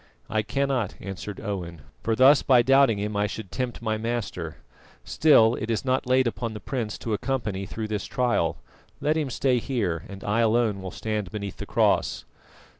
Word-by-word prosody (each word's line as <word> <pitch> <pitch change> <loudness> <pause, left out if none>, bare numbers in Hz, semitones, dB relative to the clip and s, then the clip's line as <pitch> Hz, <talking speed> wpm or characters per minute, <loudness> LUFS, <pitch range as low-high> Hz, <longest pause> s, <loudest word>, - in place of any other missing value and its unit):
"I 110 - +2
cannot," 130 -1 -1
answered 100 +1 -6
Owen, 90 -7 -5 0.2
"for 115 - 0
thus 135 +4 +6
by 125 -3 +5
doubting 135 -3 +5
Him 105 +1 -3
I 105 0 +1
should 100 -1 -7
tempt 125 -2 -4
my 110 -1 -1
Master. 110 -8 -3 0.5
Still, 120 -7 +5
it 110 - -4
is 115 +2 -1
not 130 0 0
laid 130 +1 +4
upon 115 -1 -3
the - - -5
prince 110 0 -3
to 115 - -3
accompany 105 -5 -2
through 110 -1 -4
this 105 -2 -3
trial. 120 -10 0 0.4
Let 150 +1 +1
him 155 -4 -1
stay 125 0 +1
here, 100 - -2
and 100 -1 -9
I 105 +3 0
alone 110 -3 +2
will 95 - -5
stand 105 -1 -3
beneath 100 -1 -6
the - - -7
cross." - - +1
110 Hz, 185 wpm, -26 LUFS, 100-125 Hz, 0.5 s, thus